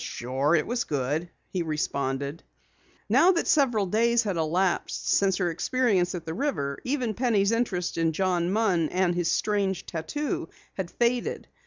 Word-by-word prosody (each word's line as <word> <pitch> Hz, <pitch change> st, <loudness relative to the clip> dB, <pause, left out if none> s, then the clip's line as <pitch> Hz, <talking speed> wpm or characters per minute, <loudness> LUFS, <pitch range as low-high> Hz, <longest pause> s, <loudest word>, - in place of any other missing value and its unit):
"Sure, 135 Hz, +6 st, 0 dB
it 155 Hz, -, +2 dB
was 240 Hz, 0 st, -1 dB
good," 145 Hz, +4 st, -2 dB, 0.2 s
he 185 Hz, -, -2 dB
responded. 140 Hz, -1 st, -2 dB, 0.7 s
Now 370 Hz, +2 st, +5 dB
that 335 Hz, -, 0 dB
several 245 Hz, -9 st, +3 dB
days 235 Hz, +5 st, +2 dB
had 200 Hz, -4 st, -2 dB
elapsed 170 Hz, +3 st, 0 dB
since 195 Hz, -2 st, +3 dB
her 180 Hz, -3 st, 0 dB
experience 190 Hz, -1 st, +1 dB
at 170 Hz, -2 st, -6 dB
the 160 Hz, -, -4 dB
river, 155 Hz, -, -2 dB
even 250 Hz, -4 st, -1 dB
Penny's 220 Hz, -4 st, +2 dB
interest 190 Hz, -8 st, -1 dB
in 165 Hz, -1 st, +2 dB
John 180 Hz, 0 st, 0 dB
Munn 190 Hz, -7 st, +2 dB
and 180 Hz, -1 st, +1 dB
his 175 Hz, -1 st, 0 dB
strange 200 Hz, -1 st, 0 dB
tattoo, 225 Hz, -, -3 dB, 0.2 s
had 190 Hz, -3 st, -4 dB
faded. 240 Hz, +3 st, -1 dB
185 Hz, 155 wpm, -26 LUFS, 165-230 Hz, 0.7 s, Now